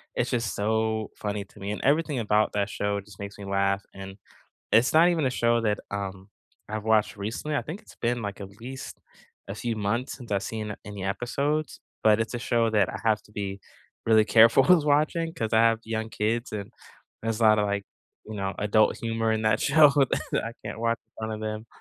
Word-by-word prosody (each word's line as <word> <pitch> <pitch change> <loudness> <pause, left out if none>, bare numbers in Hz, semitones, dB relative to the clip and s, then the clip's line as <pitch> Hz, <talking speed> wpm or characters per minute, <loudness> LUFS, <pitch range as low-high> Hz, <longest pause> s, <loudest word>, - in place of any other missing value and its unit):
it's 125 - 0
just 120 -3 -1
so 110 +1 0
funny 105 -1 -3
to 100 - -18
me, 100 +1 -4
and 105 - -4
everything 150 -1 +2
about 105 -1 +2
that 100 0 0
show 100 0 -1
just 100 -1 -16
makes 100 0 -7
me 100 - -7
laugh, 100 0 +1
and 95 0 -9 0.6
it's 115 +3 +5
not 165 +2 +6
even 165 -4 +1
a 130 - +2
show 120 -1 +2
that, 105 -2 +1
um, 95 -1 -5 0.4
I've 110 0 -3
watched 110 -2 +2
recently, 115 +9 -4
I - - 0
think 175 +8 -7
it's - - -16
been, 120 0 -1
like, 100 -1 -5
at 95 -1 -7
least 130 +2 -8 0.5
a 100 - -4
few 115 +1 -3
months 110 +5 -1
since 120 -5 -8
I've 100 -1 +1
seen 105 -2 -4
any 100 -2 -7
episodes, 140 +8 -1 0.3
but 110 0 +6
it's 115 +2 -2
a - - -1
show 115 -1 +1
that 105 -2 +3
I - - -6
have 110 -2 +2
to - - -21
be 100 -1 -4 0.5
really 110 -1 +5
careful 115 +4 +6
with 165 +1 +5
watching 155 +3 +1
'cause 110 -10 -3
I 110 - +5
have 115 -1 +4
young 110 0 -3
kids, 115 +3 -1
and 100 -2 -5 0.5
there's 115 -1 -1
a - - +3
lotta 110 -1 +5
like, 100 -1 -1 0.4
you 110 - -7
know, 95 -1 -2
adult 105 +1 +3
humor 115 -1 -1
in 110 0 -1
that 110 0 +2
show 155 -2 +6 0.4
that - - +1
I 115 - -5
can't 105 +1 -6
watch 115 0 +1
in 110 - -49
front 110 0 -3
of 110 - -7
them. 110 +1 -4
110 Hz, 215 wpm, -26 LUFS, 105-120 Hz, 0.6 s, not